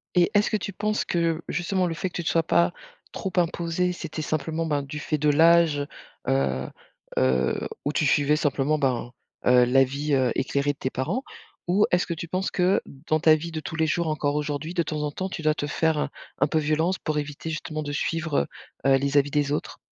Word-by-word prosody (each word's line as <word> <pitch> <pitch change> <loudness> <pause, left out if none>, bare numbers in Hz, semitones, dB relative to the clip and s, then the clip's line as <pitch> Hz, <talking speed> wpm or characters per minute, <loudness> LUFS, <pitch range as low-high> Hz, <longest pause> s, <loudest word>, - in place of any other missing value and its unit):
Et 175 -1 +5
est-ce 205 0 +3
que 215 - +2
tu 200 -1 -5
penses 210 +2 -1
que, 165 -1 0
justement, 180 +1 0
le 165 - -2
fait 185 +4 -3
que - - -16
tu 175 - -2
te - - 0
sois 165 -1 +2
pas 170 +2 +3 0.4
trop 190 - -4
imposée, 175 +1 +1
c'était 165 -2 -5
simplement, 155 +2 -2
ben, 145 -3 0
du 145 +2 -6
fait 155 +1 -1
de 150 0 +2
l'âge, 160 -2 +4 0.4
heu 65 0 +1 0.5
heu, 65 -1 +1 0.2
où 145 - 0
tu 150 - +1
suivais 145 +1 +3
simplement, 145 0 +1
ben, 125 -4 -1 0.3
heu, 125 0 +6
l'avis, 135 +3 +2
heu, 130 -3 +3
éclairé 140 +2 0
de - - -26
tes 130 - -2
parents? 165 - -2 0.4
Ou 195 +4 +4
est-ce 175 0 +3
que 170 - -3
tu 170 +1 -6
penses 185 +3 -2
que, 185 +2 +2 0.3
dans 155 - +2
ta 155 -1 +7
vie 165 +2 -5
de 160 - -3
tous 160 - -6
les 160 -1 +2
jours, 170 +2 0
encore 150 -2 0
aujourd'hui, 150 +2 -2
de 170 - +1
temps 150 -1 -3
en 150 - -2
temps, 190 +5 -4
tu 165 - -5
dois 155 - +3
te 145 - -3
faire 160 +1 +1
un - - -1 0.3
un - - +4
peu 160 - 0
violence 155 +4 +1
pour 155 -2 -2
éviter, 145 +2 -4
justement, 155 0 -4
de 145 - -4
suivre, 160 0 0 0.5
heu - - +5
heu, - - +5
les 140 +1 0
avis 140 0 +3
des 145 -1 +1
autres? 150 - -3
155 Hz, 225 wpm, -25 LUFS, 145-170 Hz, 0.5 s, ta